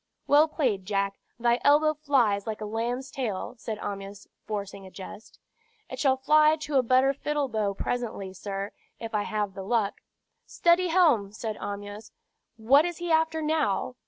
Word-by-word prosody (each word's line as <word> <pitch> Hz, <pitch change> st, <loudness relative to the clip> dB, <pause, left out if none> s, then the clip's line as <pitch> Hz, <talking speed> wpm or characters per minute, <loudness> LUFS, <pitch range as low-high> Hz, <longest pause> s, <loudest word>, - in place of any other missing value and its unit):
"Well 295 Hz, +2 st, +5 dB
played, 240 Hz, -, -1 dB
Jack; 200 Hz, -1 st, -1 dB, 0.2 s
thy 240 Hz, +1 st, +2 dB
elbow 305 Hz, +2 st, +5 dB
flies 245 Hz, -9 st, +1 dB
like 215 Hz, -1 st, -3 dB
a 215 Hz, -, -5 dB
lamb's 235 Hz, +5 st, -3 dB
tail," 225 Hz, -8 st, -3 dB
said 220 Hz, -2 st, -5 dB
Amyas, 200 Hz, -1 st, -7 dB, 0.2 s
forcing 200 Hz, -2 st, -5 dB
a -, -, -11 dB
jest. 195 Hz, +3 st, -11 dB, 0.5 s
"It -, -, -6 dB
shall 265 Hz, -2 st, +3 dB
fly 305 Hz, +3 st, +5 dB
to 300 Hz, -3 st, 0 dB
a -, -, +5 dB
better 255 Hz, +3 st, +3 dB
fiddle 295 Hz, 0 st, -2 dB
bow 215 Hz, -4 st, -1 dB
presently, 215 Hz, -5 st, -3 dB
sir, 195 Hz, +1 st, -5 dB, 0.3 s
if 225 Hz, 0 st, -7 dB
I 210 Hz, -, +1 dB
have 210 Hz, -2 st, -2 dB
the 195 Hz, -, -7 dB
luck 210 Hz, 0 st, -1 dB, 0.3 s
" -, -, -52 dB
"Steady, 345 Hz, +1 st, +3 dB
helm!" 310 Hz, -, +3 dB
said 220 Hz, 0 st, -4 dB
Amyas. 205 Hz, +1 st, -7 dB, 0.5 s
"What 260 Hz, +7 st, +5 dB
is 350 Hz, -1 st, -3 dB
he 345 Hz, -1 st, -3 dB
after 320 Hz, 0 st, +2 dB
now?" 300 Hz, -7 st, 0 dB
235 Hz, 170 wpm, -27 LUFS, 205-295 Hz, 0.5 s, Well